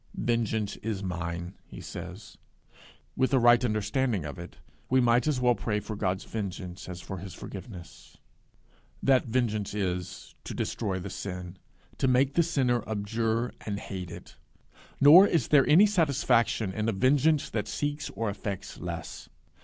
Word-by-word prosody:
'Vengeance 110 Hz, -3 st, -1 dB
is 105 Hz, -3 st, -4 dB
mine,' 85 Hz, -1 st, -4 dB
he -, -, -10 dB
says: -, -, -9 dB, 0.8 s
with 130 Hz, +1 st, +2 dB
a -, -, +5 dB
right 120 Hz, 0 st, +5 dB
understanding 110 Hz, -, 0 dB
of 75 Hz, +3 st, -7 dB
it, 85 Hz, -, -10 dB, 0.3 s
we 130 Hz, -, +4 dB
might 120 Hz, +2 st, +3 dB
as 145 Hz, -4 st, +1 dB
well 125 Hz, -1 st, +4 dB
pray 105 Hz, 0 st, -2 dB
for 105 Hz, +1 st, -6 dB
God's 95 Hz, -2 st, -1 dB
vengeance 95 Hz, -4 st, -6 dB
as 90 Hz, -1 st, -7 dB
for 95 Hz, 0 st, -6 dB
his 95 Hz, -2 st, -8 dB
forgiveness; 95 Hz, -, -10 dB, 0.9 s
that 130 Hz, -2 st, +3 dB
vengeance 110 Hz, -4 st, -1 dB
is, 90 Hz, -3 st, -3 dB
to -, -, -6 dB
destroy 100 Hz, -4 st, -2 dB
the 95 Hz, +1 st, -6 dB
sin 90 Hz, -2 st, -6 dB, 0.4 s
to 135 Hz, -, +2 dB
make 130 Hz, +2 st, +3 dB
the 170 Hz, -, +4 dB
sinner 130 Hz, -8 st, +1 dB
abjure 110 Hz, +3 st, -1 dB
and 100 Hz, -2 st, -3 dB
hate 95 Hz, -4 st, -6 dB
it; 85 Hz, -2 st, -11 dB, 0.6 s
nor 165 Hz, +8 st, +9 dB
is 165 Hz, -, 0 dB
there 140 Hz, -3 st, +5 dB
any 170 Hz, +8 st, +8 dB
satisfaction 140 Hz, -, +2 dB
in 110 Hz, +2 st, -1 dB
a -, -, 0 dB
vengeance 140 Hz, +8 st, +2 dB
that 105 Hz, -, -2 dB
seeks 145 Hz, 0 st, -3 dB
or 115 Hz, +3 st, -2 dB
effects 100 Hz, -1 st, -5 dB
less. 85 Hz, -2 st, -6 dB
110 Hz, 155 wpm, -28 LUFS, 95-130 Hz, 0.9 s, nor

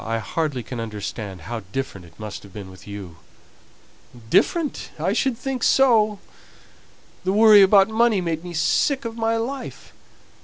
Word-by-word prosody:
I 115 Hz, 0 st, -2 dB
hardly 130 Hz, +4 st, -2 dB
can 125 Hz, 0 st, -7 dB
understand 105 Hz, -3 st, -6 dB
how 115 Hz, +7 st, -5 dB
different 100 Hz, -8 st, -5 dB
it 80 Hz, -2 st, -21 dB
must 105 Hz, -2 st, -7 dB
have 100 Hz, -, -15 dB
been 95 Hz, -1 st, -9 dB
with 95 Hz, +2 st, -15 dB
you." 100 Hz, -5 st, -8 dB, 1.1 s
"Different! 330 Hz, -5 st, +1 dB
I 175 Hz, +6 st, 0 dB
should 245 Hz, +1 st, 0 dB
think 260 Hz, 0 st, -4 dB
so. 225 Hz, -6 st, +4 dB, 1.1 s
The 185 Hz, -, 0 dB
worry 215 Hz, -1 st, +7 dB
about 195 Hz, 0 st, +6 dB
money 220 Hz, -1 st, +2 dB
made 165 Hz, -2 st, -3 dB
me 175 Hz, -1 st, -7 dB
sick 270 Hz, -, +1 dB
of 225 Hz, -1 st, -5 dB
my 225 Hz, 0 st, 0 dB
life. 255 Hz, +4 st, -6 dB
175 Hz, 155 wpm, -22 LUFS, -, 1.1 s, worry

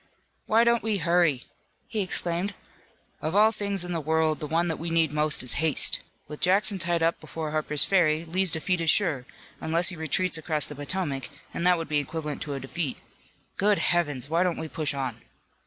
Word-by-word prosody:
"Why 225 Hz, +2 st, +4 dB
don't 235 Hz, 0 st, +3 dB
we 215 Hz, -2 st, 0 dB
hurry!" 170 Hz, -6 st, +2 dB, 0.4 s
he 220 Hz, -, -4 dB
exclaimed. 185 Hz, +1 st, 0 dB, 0.7 s
"Of 160 Hz, +4 st, -3 dB
all 215 Hz, +2 st, +5 dB
things 200 Hz, -4 st, -1 dB
in 180 Hz, -, -6 dB
the 165 Hz, -, -2 dB
world 160 Hz, 0 st, +1 dB
the 150 Hz, -, -5 dB
one 165 Hz, +3 st, +1 dB
that 160 Hz, -, -3 dB
we 170 Hz, -, -4 dB
need 165 Hz, -2 st, +1 dB
most 150 Hz, -3 st, +3 dB
is 125 Hz, -, +3 dB
haste. 160 Hz, -3 st, +3 dB, 0.3 s
With 150 Hz, 0 st, -8 dB
Jackson 195 Hz, +2 st, +3 dB
tied 170 Hz, -1 st, +1 dB
up 165 Hz, +1 st, +1 dB
before 160 Hz, -2 st, -6 dB
Harper's 150 Hz, -1 st, 0 dB
Ferry, 165 Hz, -4 st, +2 dB
Lee's 180 Hz, +2 st, +2 dB
defeat 175 Hz, +2 st, 0 dB
is 165 Hz, -, 0 dB
sure, 155 Hz, -12 st, +1 dB, 0.3 s
unless 165 Hz, +3 st, +1 dB
he 185 Hz, -, -3 dB
retreats 165 Hz, +2 st, 0 dB
across 155 Hz, -2 st, 0 dB
the -, -, -7 dB
Potomac, 145 Hz, -2 st, -3 dB, 0.2 s
and 170 Hz, -, -1 dB
that 180 Hz, -1 st, +4 dB
would 165 Hz, -, -5 dB
be 150 Hz, -1 st, +1 dB
equivalent 150 Hz, +1 st, -5 dB
to 145 Hz, -2 st, -3 dB
a -, -, -4 dB
defeat. 135 Hz, +2 st, -4 dB, 0.6 s
Good 205 Hz, +1 st, +3 dB
Heavens, 145 Hz, -7 st, 0 dB
why 165 Hz, +3 st, +1 dB
don't 180 Hz, -2 st, 0 dB
we 160 Hz, -, -5 dB
push 150 Hz, -2 st, +1 dB
on?" 125 Hz, -4 st, -4 dB
165 Hz, 200 wpm, -26 LUFS, 150-180 Hz, 0.7 s, all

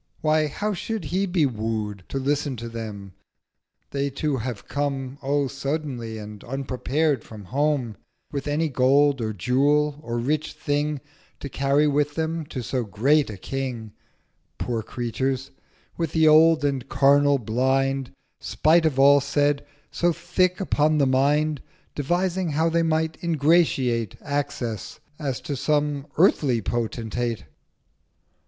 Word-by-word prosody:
Why 155 Hz, 0 st, +2 dB
how 210 Hz, +8 st, -2 dB
should 220 Hz, +1 st, -4 dB
he 190 Hz, +3 st, 0 dB
be 175 Hz, -4 st, +2 dB
woo'd 110 Hz, -5 st, -3 dB
To -, -, -3 dB
listen 140 Hz, 0 st, -1 dB
to 115 Hz, +1 st, -6 dB
them? 105 Hz, -4 st, -7 dB, 0.8 s
they 140 Hz, 0 st, -1 dB
too 140 Hz, +1 st, -1 dB
have 120 Hz, -3 st, -5 dB
come 140 Hz, -1 st, -3 dB
1030 135 Hz, -, -9 dB
O 145 Hz, -1 st, +2 dB
So -, -, -9 dB
suddenly, 135 Hz, -6 st, -3 dB
and 105 Hz, -1 st, -9 dB
unprepared 135 Hz, +2 st, -1 dB
from 105 Hz, -3 st, -11 dB
home 135 Hz, -2 st, 0 dB, 0.3 s
With 140 Hz, -1 st, -4 dB
any 150 Hz, +3 st, +1 dB
Gold, 140 Hz, +1 st, +3 dB
or 110 Hz, -1 st, -1 dB
Jewel, 145 Hz, +8 st, +1 dB
or 120 Hz, -5 st, -4 dB
rich 150 Hz, +6 st, -1 dB
Thing 145 Hz, -1 st, -1 dB, 0.4 s
To 140 Hz, -, -5 dB
carry 140 Hz, +3 st, +2 dB
with 145 Hz, 0 st, +1 dB
them 160 Hz, -1 st, -2 dB
to 130 Hz, -4 st, -5 dB
so 125 Hz, +1 st, -1 dB
great 135 Hz, +8 st, +2 dB
a 105 Hz, -, -7 dB
King— 125 Hz, -1 st, -4 dB, 0.7 s
Poor 115 Hz, -2 st, -2 dB
Creatures! 130 Hz, +4 st, -3 dB, 0.5 s
with 165 Hz, -3 st, -2 dB
the 160 Hz, -1 st, +4 dB
old 155 Hz, 0 st, +6 dB
and 135 Hz, -3 st, -1 dB
carnal 140 Hz, +1 st, +4 dB
Blind, 130 Hz, +3 st, 0 dB, 0.3 s
Spite 160 Hz, +1 st, +3 dB
of 140 Hz, -4 st, -2 dB
all 140 Hz, +1 st, +6 dB
said, 145 Hz, +1 st, +1 dB, 0.3 s
so 175 Hz, 0 st, +2 dB
thick 175 Hz, +2 st, 0 dB
upon 155 Hz, -5 st, +2 dB
the 140 Hz, -, +4 dB
Mind, 145 Hz, +3 st, +2 dB, 0.3 s
Devising 175 Hz, +3 st, -1 dB
how 160 Hz, +3 st, +2 dB
they 165 Hz, +1 st, +2 dB
might 160 Hz, 0 st, -1 dB
ingratiate 145 Hz, -, +2 dB
Access, 140 Hz, -5 st, -3 dB, 0.2 s
as 140 Hz, -5 st, -2 dB
to 145 Hz, -, -4 dB
some 145 Hz, 0 st, 0 dB
earthly 145 Hz, -8 st, +3 dB
Potentate. 115 Hz, +1 st, -2 dB
140 Hz, 140 wpm, -24 LUFS, 125-155 Hz, 0.8 s, old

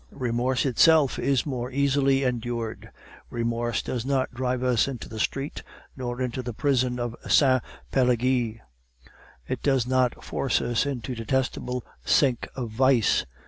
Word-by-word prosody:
"Remorse 125 Hz, +1 st, -1 dB
itself 145 Hz, +2 st, +4 dB
is 135 Hz, -2 st, +1 dB
more 125 Hz, -4 st, -3 dB
easily 140 Hz, 0 st, +2 dB
endured. 120 Hz, -2 st, -3 dB, 0.4 s
Remorse 115 Hz, -1 st, -1 dB
does 120 Hz, -3 st, -3 dB
not 130 Hz, -1 st, 0 dB
drive 125 Hz, 0 st, -1 dB
us 125 Hz, -2 st, +2 dB
into 130 Hz, -4 st, -6 dB
the 110 Hz, -, -8 dB
street 135 Hz, +6 st, -2 dB, 0.3 s
nor 125 Hz, -2 st, -4 dB
into 125 Hz, +1 st, -3 dB
the 120 Hz, -2 st, -6 dB
prison 130 Hz, -3 st, +1 dB
of 120 Hz, -1 st, -3 dB
Sainte 130 Hz, -3 st, +5 dB, 0.3 s
Pelagie; 125 Hz, -2 st, +1 dB, 0.9 s
it -, -, -3 dB
does 135 Hz, -4 st, +2 dB
not 130 Hz, -1 st, +1 dB
force 135 Hz, -, 0 dB
us 120 Hz, +3 st, 0 dB
into 130 Hz, -2 st, -4 dB
the 125 Hz, -, -5 dB
detestable 125 Hz, 0 st, -1 dB, 0.2 s
sink 130 Hz, -5 st, +2 dB
of 120 Hz, -4 st, -4 dB
vice. 125 Hz, -, +3 dB
125 Hz, 145 wpm, -26 LUFS, 120-135 Hz, 0.9 s, Sainte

